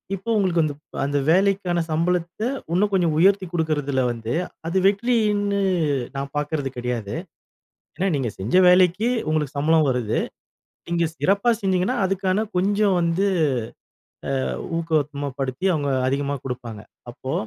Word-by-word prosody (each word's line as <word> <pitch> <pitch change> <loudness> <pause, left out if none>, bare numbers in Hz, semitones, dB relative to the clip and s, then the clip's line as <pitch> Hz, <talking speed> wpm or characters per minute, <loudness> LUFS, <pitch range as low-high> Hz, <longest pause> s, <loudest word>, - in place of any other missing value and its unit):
இப்போ 195 +5 -8
உங்களுக்கு 180 -4 +2
வந்து. 150 -2 -1 0.3
அந்த 145 +1 0
வேலைக்கான 185 0 +2
சம்பளத்த, 175 +3 -1 0.3
இன்னும் 205 +4 +2
கொஞ்சம் 170 -5 +2
உயர்த்தி 190 +3 +4
குடுக்கிறதில 145 -5 0
வந்து 115 0 -4 0.3
அது 170 +3 0
வெற்றியின்னு 205 -1 +2 0.6
நான் 140 0 -4
பார்க்கறது 145 -1 -2
கிடையாது. 120 -3 -3 0.8
ஏன்னா 190 - 0
நீங்க 135 -5 0
செஞ்ச 95 - -4
வேலைக்கு 185 +4 +4 0.2
உங்களுக்கு 150 -3 -1
சம்பளம் 155 +1 +3
வருது. 125 -4 0 0.7
நீங்க 170 0 +1
சிறப்பா 200 +5 +2
செஞ்சீங்கன்னா, 190 +4 +1
அதுக்கான 195 +2 0
கொஞ்சம் 200 +1 +2
வந்து 170 +4 +1 1.2
அ - - -1 0.3
ஊக்கப்படுத்தி 145 -2 -2
அவுங்க 145 -3 -1 0.2
அதிகமா 140 +1 -1
குடுப்பாங்க. 120 -4 -6 0.3
அப்போ 130 +2 -6
165 Hz, 120 wpm, -23 LUFS, 140-190 Hz, 1.2 s, உயர்த்தி